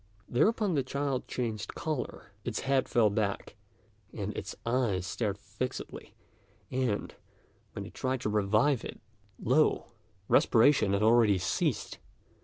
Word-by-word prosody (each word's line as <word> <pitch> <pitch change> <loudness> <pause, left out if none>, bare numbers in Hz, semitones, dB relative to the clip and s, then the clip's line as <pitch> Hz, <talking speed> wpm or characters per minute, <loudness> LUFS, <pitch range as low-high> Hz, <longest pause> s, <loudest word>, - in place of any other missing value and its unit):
Thereupon 210 - +2
the 145 - +2
child 135 0 -2
changed 115 -4 -3
colour; 155 -9 -4
its 120 -3 -3
head 135 -1 +1
fell 110 -4 +4
back, 100 -1 -2 0.6
and - - -4
its - - -5
eyes 115 -7 +1
stared 100 +2 -2
fixedly, 105 +5 -6 0.6
and, 125 -5 -1 0.6
when - - -5
they - - -9
tried 130 -1 -2
to 110 - -1
revive 110 +6 +2
it, - - -7 0.4
lo! 150 +6 +2 0.4
respiration 115 -4 +4
had 100 +1 +1
already 110 -3 +5
ceased. 90 - -1
120 Hz, 125 wpm, -30 LUFS, 105-130 Hz, 0.6 s, already